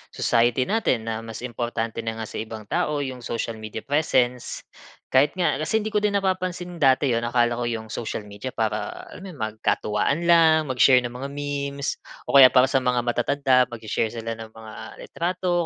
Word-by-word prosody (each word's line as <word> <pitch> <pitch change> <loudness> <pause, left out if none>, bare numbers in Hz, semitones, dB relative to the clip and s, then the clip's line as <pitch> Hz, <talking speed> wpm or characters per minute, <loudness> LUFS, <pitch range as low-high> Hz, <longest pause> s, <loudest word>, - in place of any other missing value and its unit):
society 120 +2 +2
natin 130 - 0
na 110 - -3
mas 115 +1 -8
importante 120 -2 -3
na 115 -1 -3
nga 110 - -5
sa 110 - -6
ibang 110 0 -6
tao 150 -1 0
yung 130 -2 -5
social 115 -1 -4
media 110 0 -7
presence. 130 -4 0 0.5
Kahit 140 +5 +4
nga 175 -6 +1
kasi 210 +8 0
hindi 215 - -4
ko 210 - +1
din 205 -1 0
napapansin 185 -2 -2
dati 135 -1 +4
'yon 115 0 0
akala 120 0 +1
ko 120 - -2
'yong 110 -2 -4
social 115 -1 -4
media 105 +6 -7
para 110 -1 -3
alam 190 - -10
mo 155 -11 -6
magkatuwaan 110 +5 0
lang, 160 -3 +5
mag-share 125 0 +5
ng 120 - -4
mga 125 +3 -6
memes 140 -1 -3 0.3
o - - +5
kaya 135 -2 +11
para 130 0 +5
sa 135 - +2
mga 125 -1 +1
matatanda 125 +2 +2
magse-share 110 0 -2
sila 115 -1 -5
ng 110 -1 -10
mga 110 -1 -11 0.3
litrato 175 0 -1
125 Hz, 185 wpm, -24 LUFS, 115-150 Hz, 0.5 s, kaya